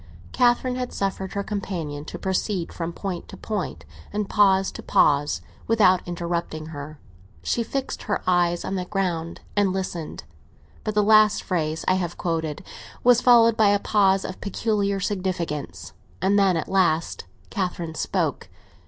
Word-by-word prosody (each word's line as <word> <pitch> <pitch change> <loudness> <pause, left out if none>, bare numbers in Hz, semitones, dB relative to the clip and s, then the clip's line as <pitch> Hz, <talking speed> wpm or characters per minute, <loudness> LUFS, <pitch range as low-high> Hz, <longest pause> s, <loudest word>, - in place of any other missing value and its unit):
Catherine 250 0 +2
had 250 -1 -3
suffered 195 -1 -2
her 200 - -2
companion 170 -8 -4
to - - -7
proceed 190 -1 -2
from 165 0 -4
point 180 0 -5
to - - -10
point, 210 -4 -4 0.3
and 210 -1 -2
pause 195 -2 +3
to - - -8
pause, 145 0 +2 0.3
without 195 -5 +4
interrupting 170 -2 -3
her; 145 +1 -7 0.5
she 235 - 0
fixed 265 +3 -3
her 205 - -2
eyes 175 -1 +2
on 190 - -3
the 185 -2 -2
ground 175 -4 -2
and 205 -2 +3
listened. 185 -4 -4 0.6
But 215 -1 -3
the 210 - +4
last 215 0 +5
phrase 160 -3 -2
I - - +5
have 175 -1 -4
quoted 160 -2 -2 0.4
was 245 0 +6
followed 230 -2 +6
by 215 -2 +4
a 205 - +4
pause 195 -2 +2
of 185 - -7
peculiar 200 -1 0
significance, 170 - -3 0.3
and 195 +2 +3
then, 190 -3 +3
at 160 - -3
last, 170 -4 +1 0.3
Catherine 175 -5 -3
spoke. - - -2
190 Hz, 155 wpm, -24 LUFS, 170-205 Hz, 0.6 s, was